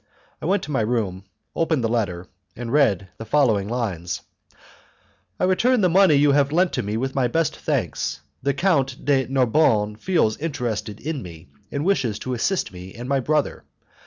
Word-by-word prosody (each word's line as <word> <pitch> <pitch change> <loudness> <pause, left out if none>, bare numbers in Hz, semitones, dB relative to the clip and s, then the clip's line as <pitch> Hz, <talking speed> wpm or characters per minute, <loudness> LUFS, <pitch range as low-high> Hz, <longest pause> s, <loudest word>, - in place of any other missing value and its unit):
I 155 - -3
went 200 +3 +1
to 150 - -6
my 130 - +1
room, 105 -5 -1 0.3
opened 160 -6 +1
the - - +2
letter, 100 -7 -1 0.3
and 120 0 -5
read 100 -11 +2
the - - -5
following 110 -7 +2
lines: 95 -8 -3 1.2
"I - - -1
return 230 +7 +3
the 180 - +4
money 185 -2 +5
you 145 0 +4
have 140 0 +3
lent 175 +3 +1
me 105 +2 -2
with 135 +3 -2
my 130 -2 +2
best 165 +5 0
thanks. - - -2 0.2
The 140 0 0
Count 140 -7 +1
de 135 -3 +2
Narbonne 120 -5 +2
feels 135 -6 +1
interested 120 -9 -3
in 150 -2 -4
me, 80 -5 -11 0.2
and 145 +2 -2
wishes 125 - +1
to 130 - -4
assist 145 - -1
me 90 +1 -10
and 120 +2 -7
my 140 0 +1
brother. 150 +2 0
130 Hz, 175 wpm, -23 LUFS, 110-155 Hz, 1.2 s, money